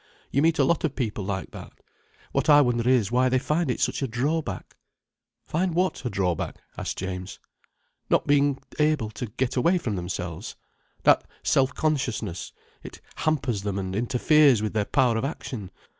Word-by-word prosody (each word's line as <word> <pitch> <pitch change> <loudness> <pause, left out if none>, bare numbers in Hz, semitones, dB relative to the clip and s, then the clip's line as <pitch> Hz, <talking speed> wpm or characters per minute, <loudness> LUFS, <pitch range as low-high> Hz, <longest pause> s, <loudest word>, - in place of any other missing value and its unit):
You 140 - +2
meet 165 +1 +3
a 140 - +4
lot 160 +5 +1
of 155 -4 -1
people 110 -6 -2
like 95 -1 -4
that. - - -10 0.6
What - - 0
I 145 -1 +8
wonder 120 -2 +1
is 120 -6 +3
why 130 +1 +3
they 130 - +3
find 150 +4 0
it 125 - -1
such - - 0
a 135 - 0
drawback." 130 - -2 0.7
"Find 175 +1 -1
what 185 -3 0
a 125 - -1
drawback?" 95 -5 -1 0.2
asked - - -4
James. 95 0 -5 0.7
"Not - - +3
being 145 -1 +3 0.2
able 150 -8 +2
to 120 - -5
get 125 +4 -2
away 170 +8 +3
from 115 - -2
themselves. 90 -1 -5 0.5
That - - +5 0.2
self 130 -1 +2
consciousness. 115 - -2 0.3
It - - -10 0.2
hampers 135 -9 0
them, 100 -1 -3
and 95 -1 -3
interferes 125 +2 +4
with 110 - -2
their 105 -2 +1
power 125 -3 +2
of 110 - -2
action. 125 - -5
125 Hz, 175 wpm, -25 LUFS, 105-145 Hz, 0.7 s, I